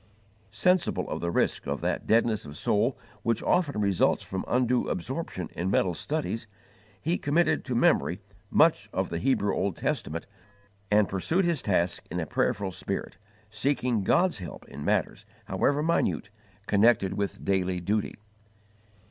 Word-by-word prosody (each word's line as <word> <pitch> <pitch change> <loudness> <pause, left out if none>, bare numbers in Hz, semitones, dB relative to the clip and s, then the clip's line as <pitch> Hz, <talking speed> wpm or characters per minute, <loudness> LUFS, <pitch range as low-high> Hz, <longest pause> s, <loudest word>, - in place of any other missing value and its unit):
Sensible 175 - +1
of - - -3
the 85 - -1
risk - - 0
of - - -2
that - - -2
deadness 115 -2 +3
of 75 +1 -9
soul 115 - +1 0.2
which 115 -1 0
often 150 -10 +1
results 100 -3 +2
from 95 0 -4
undue 125 0 +2
absorption 110 - -4
in 90 +2 -1
mental 95 -2 +2
studies, 115 - -3 0.5
he 165 - -1
committed 160 +4 +2
to 125 - -3
memory 120 - +3 0.3
much - - +3
of - - -2
the 85 - -2
Hebrew 105 -1 +1
Old 95 -2 -1
Testament 80 +2 -2 0.6
and 105 -1 +4
pursued 160 - +1
his 170 -6 +1
tasks 90 -3 +1
in 90 - -3
a 80 - -1
prayerful 95 +5 0
spirit, 90 - -4 0.3
seeking 120 -1 0
God's 175 - +2
help 90 -3 -9
in 70 +1 -8
matters, - - 0 0.2
however 145 +2 +1
minute, 165 -10 0 0.3
connected 105 -2 +3
with 100 -1 -3
daily 95 -2 +1
duty. 105 +4 -1
105 Hz, 150 wpm, -27 LUFS, 95-135 Hz, 0.6 s, and